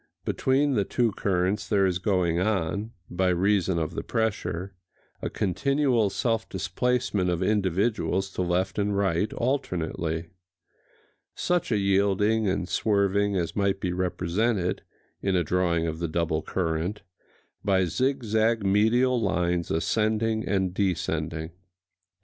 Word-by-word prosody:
Between 140 +2 +1
the 105 -5 +2
two 120 +2 +1
currents 95 +1 -1
there 100 -3 +3
is 90 -1 0
going 90 -3 +1
on, 100 +1 -1 0.2
by 90 +1 0
reason 95 0 +2
of 80 -2 -2
the - - -3
pressure, 100 -4 -2 0.5
a - - -2
continual 130 - +1
self 115 +2 -1
displacement 95 0 0
of 90 +1 0
individuals 95 -1 0
to 95 - -3
left 90 +2 0
and 100 0 0
right, 100 +1 +1
alternately,—such 90 - -4
a 110 - +3
yielding 100 +2 +2
and 95 -2 -1
swerving 100 0 +1
as 85 -3 -2
might 100 -1 +1
be 90 -2 -2
represented, 90 +2 0 0.4
in 95 -1 0
a 90 - +2
drawing 85 0 +1
of 80 -1 -3
the 85 - -1
double 80 -1 -1
current, 85 +4 -2 0.6
by 95 -2 +3
zigzag 115 - +1
medial 115 +5 +3
lines 90 -3 0
ascending 110 +5 0
and 95 -3 0
descending. 80 -4 -1
95 Hz, 125 wpm, -26 LUFS, 90-110 Hz, 0.6 s, there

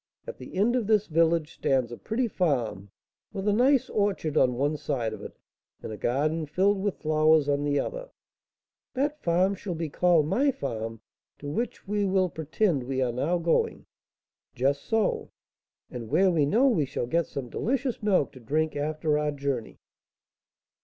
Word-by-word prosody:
At - - -8
the - - -10
end 215 +6 +2
of 235 -5 0
this 215 -2 +3
village 165 -1 +1
stands 130 -3 0
a - - -5
pretty 235 - -2
farm, 120 - -1 0.4
with 195 0 -4
a 205 - +4
nice 255 +4 +3
orchard 200 -7 -1
on 125 -4 +3
one 145 +4 0
side 120 -6 -2
of - - -8
it, - - -10 0.5
and - - -5
a - - -5
garden, 155 +7 0
filled 190 +6 +2
with 205 -1 -1
flowers, 155 -1 +3
on 145 0 +1
the 145 -1 +1
other - - -4 0.4
" - - -67
"That 290 +3 -1
farm 180 +3 +2
shall 190 -2 -5
be 165 -1 -3
called 170 0 +3
my 270 - +2
farm, 115 - -4 0.4
to 145 - -9
which 230 +4 -4
we 205 0 0
will 190 -1 +2
pretend 160 0 0
we 130 +1 -3
are 125 -2 +1
now 145 +9 0
going." 170 -1 0 0.7
"Just 140 +3 0
so." 225 -2 0 0.6
"And 115 -3 -7
where 190 +7 +4
we 155 -5 +2
know 235 - +4
we 185 - +2
shall 125 - -3
get 165 +7 0
some 135 -3 -5
delicious 255 - -2
milk 195 -9 +2
to 130 - -13
drink 155 +7 -1
after 150 +1 0
our 150 0 0
journey!" 140 -5 -3
160 Hz, 180 wpm, -27 LUFS, 140-205 Hz, 0.7 s, a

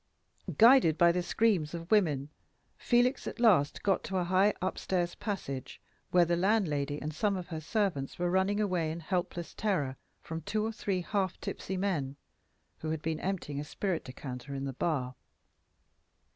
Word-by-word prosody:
Guided 230 - +7
by 170 0 +6
the 180 +1 0
screams 175 -5 +1
of 170 +3 -8
women, 150 -10 +3 0.5
Felix 245 +2 +2
at - - -6
last 200 -12 +4
got 195 -2 +2
to 190 - -2
a 180 - +1
high 185 +4 +3
up 185 +1 -2
stairs 175 -2 -1
passage, 140 - -5 0.3
where 175 -1 +5
the 170 +1 +1
landlady 165 -7 +1
and 155 +1 -4
some 200 +5 +1
of 180 - -7
her 160 -2 -4
servants 170 -6 -1
were 175 0 0
running 190 +3 +2
away 180 -6 0
in 160 +2 -4
helpless 175 0 -3
terror 150 -11 -1 0.2
from 160 0 -6
two 215 +6 -1
or 225 - -1
three 200 -4 -2
half 190 +1 -1
tipsy 190 - -4
men, 160 -9 -1 0.6
who 155 - -4
had 160 -1 -3
been 160 -1 -1
emptying 175 -7 -3
a - - -3
spirit 175 +3 -2
decanter 130 +1 -7
in 135 0 -3
the 135 - -3
bar. 130 -3 -1
175 Hz, 170 wpm, -31 LUFS, 150-200 Hz, 0.6 s, Guided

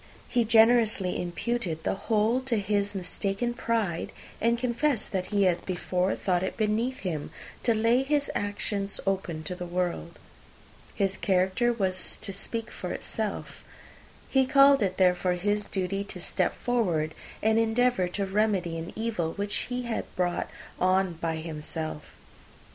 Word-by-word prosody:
He 240 -2 +2
generously 220 -4 +4
imputed 175 -2 -2
the - - +1
whole 220 +4 +1
to 240 -4 +1
his 205 0 0
mistaken 195 +5 -2
pride, 225 -8 -1 0.3
and 235 +1 +3
confessed 245 0 0
that 185 -2 -1
he 205 -1 +2
had 180 -2 +2
before 180 0 0
thought 180 -3 0
it 190 - -3
beneath 225 +4 0
him 160 -6 -3 0.3
to 230 - +2
lay 230 +3 +3
his 285 +1 +1
private 205 - 0
actions 200 -1 -2
open 185 -5 -1
to 170 - -4
the 180 0 -6
world. 175 -1 -2 0.8
His 195 -2 0
character 190 +5 +2
was 190 -5 -1
to 200 - -6
speak 230 +4 -2
for - - -5
itself. - - -4 0.6
He 265 -1 +3
called 275 -1 +6
it, 185 -2 0
therefore, 180 -1 +3
his 205 +4 0
duty 195 +1 -2
to 190 - -5
step - - 0
forward, 175 -11 0 0.3
and 220 +1 +4
endeavour 225 -3 +2
to 195 +3 -2
remedy 190 -4 +1
an 165 - -7
evil 215 -8 -1
which 205 +1 -2
had 245 0 -3
been 225 - -1
brought 175 -1 0 0.3
on 185 0 +3
by 165 0 -2
himself. 155 -1 -5
200 Hz, 150 wpm, -28 LUFS, 180-230 Hz, 0.8 s, called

